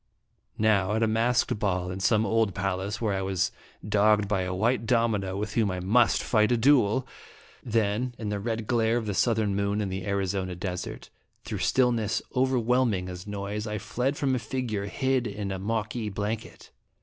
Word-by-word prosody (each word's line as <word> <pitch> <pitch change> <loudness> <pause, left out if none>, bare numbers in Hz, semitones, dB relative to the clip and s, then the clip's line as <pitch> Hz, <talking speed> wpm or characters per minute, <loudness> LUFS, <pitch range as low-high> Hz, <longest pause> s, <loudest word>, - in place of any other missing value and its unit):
Now, 105 -2 +2
at 110 - +1
a - - +3
masked 115 0 +1
ball 90 -3 -1
in 90 - -5
some 110 +3 +3
old 110 -5 +1
palace, 95 +3 -2
where 110 -3 0
I 95 - -1
was 95 -2 0 0.4
dogged 105 0 +3
by 100 -2 0
a 90 0 -2
white 115 +3 +1
domino 110 -6 +1
with 105 +1 -3
whom 110 -2 +2
1 90 -2 -3
must 115 +3 +3
fight 110 0 +2
a 120 - +3
duel; 130 -1 +3 0.6
then, 115 +2 0
in 110 -2 -4
the 105 -1 -2
red 115 +1 -3
glare 115 0 +2
of 115 - -2
the 105 - -2
southern 110 -2 +1
moon 100 +1 0
in 105 -2 -1
the 95 0 -4
Arizona 95 -2 -1
desert, 90 0 -5 0.3
through - - -5
stillness 120 -5 +2 0.2
overwhelming 125 -6 +1
as 90 +2 -8
noise, 105 +1 -4
I 105 0 -2
fled 125 +7 -2
from 135 -2 +1
a 130 - +1
figure 115 -5 -3
hid 130 +3 0
in 100 -2 -4
a 95 - -3
Moqui 110 +2 -2
blanket. 105 +3 -5
105 Hz, 185 wpm, -27 LUFS, 100-115 Hz, 0.6 s, a